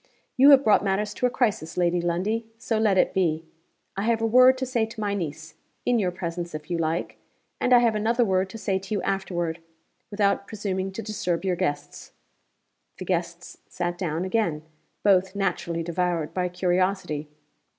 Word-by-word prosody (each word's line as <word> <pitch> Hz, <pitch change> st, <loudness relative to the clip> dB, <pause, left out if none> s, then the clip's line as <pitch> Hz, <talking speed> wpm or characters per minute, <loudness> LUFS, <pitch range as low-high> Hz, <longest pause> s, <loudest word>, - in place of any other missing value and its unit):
'You 275 Hz, +1 st, +7 dB
have 280 Hz, -1 st, +8 dB
brought 210 Hz, -4 st, +4 dB
matters 205 Hz, +1 st, -1 dB
to 250 Hz, -, +1 dB
a -, -, -1 dB
crisis, 210 Hz, -11 st, -1 dB
Lady 175 Hz, 0 st, +2 dB
Lundie. 195 Hz, +7 st, -1 dB
So 225 Hz, -1 st, -1 dB
let 210 Hz, -3 st, +3 dB
it -, -, +3 dB
be. 165 Hz, -4 st, 0 dB, 0.5 s
I 195 Hz, -, -2 dB
have 230 Hz, -1 st, +2 dB
a 225 Hz, -, 0 dB
word 255 Hz, +3 st, +6 dB
to 260 Hz, -, -2 dB
say 240 Hz, -3 st, 0 dB
to 220 Hz, -, -11 dB
my 205 Hz, -1 st, -1 dB
niece 160 Hz, -4 st, -5 dB, 0.3 s
(in 245 Hz, -1 st, +2 dB
your 190 Hz, -4 st, +1 dB
presence, 175 Hz, -2 st, -5 dB
if 155 Hz, +3 st, -8 dB
you 170 Hz, -, 0 dB
like); 165 Hz, +1 st, -2 dB, 0.4 s
and 250 Hz, -, 0 dB
I 250 Hz, -, +9 dB
have 235 Hz, -2 st, +3 dB
another 230 Hz, +3 st, +1 dB
word 190 Hz, -1 st, +1 dB
to 225 Hz, -, -8 dB
say 195 Hz, -3 st, -1 dB
to 195 Hz, +2 st, -4 dB
you 200 Hz, -, -1 dB
afterward 175 Hz, -4 st, -2 dB, 0.5 s
without 200 Hz, -1 st, 0 dB
presuming 195 Hz, -3 st, -3 dB
to 225 Hz, -, -5 dB
disturb 200 Hz, -5 st, -2 dB
your 185 Hz, -2 st, +1 dB
guests.' 145 Hz, -3 st, -4 dB, 0.8 s
The -, -, -7 dB
guests -, -, -3 dB
sat 175 Hz, 0 st, -3 dB
down 175 Hz, -1 st, -2 dB
again 185 Hz, -7 st, 0 dB, 0.4 s
(both 190 Hz, -1 st, +3 dB
naturally 175 Hz, -4 st, -1 dB
devoured 170 Hz, -2 st, -1 dB
by 180 Hz, -1 st, -1 dB
curiosity). 180 Hz, -4 st, -1 dB
190 Hz, 180 wpm, -25 LUFS, 175-220 Hz, 0.8 s, I